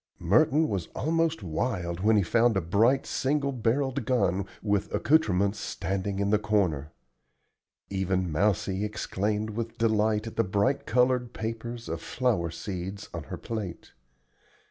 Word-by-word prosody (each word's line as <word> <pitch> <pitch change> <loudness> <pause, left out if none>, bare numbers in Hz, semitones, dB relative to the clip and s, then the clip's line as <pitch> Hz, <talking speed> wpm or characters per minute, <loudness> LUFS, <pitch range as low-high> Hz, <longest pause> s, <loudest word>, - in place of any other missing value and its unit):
Merton 145 - +3
was 95 -5 -2
almost 165 -3 0
wild 85 -1 -2
when 110 +3 +4
he 100 - +3
found 115 +2 +3
a - - +1
bright 110 +10 +3
single 140 +1 0
barrelled 130 +2 0
gun 100 -6 +1 0.2
with 105 -2 0
accoutrements 100 - +2
standing 95 0 -3
in 100 0 0
the 105 - +4
corner. 90 -9 0 1.0
Even 95 -2 0
Mousie 95 +3 +1
exclaimed 105 +1 -2
with 115 +1 -5
delight 110 -1 +2
at 115 - -8
the 115 - +4
bright 100 +8 0
colored 125 0 +2
papers 115 +1 -5
of 80 0 -4
flower 115 -10 0
seeds 95 +3 -6
on 85 -4 -5
her - - -6
plate. 105 -7 -6
105 Hz, 140 wpm, -28 LUFS, 95-120 Hz, 1.0 s, when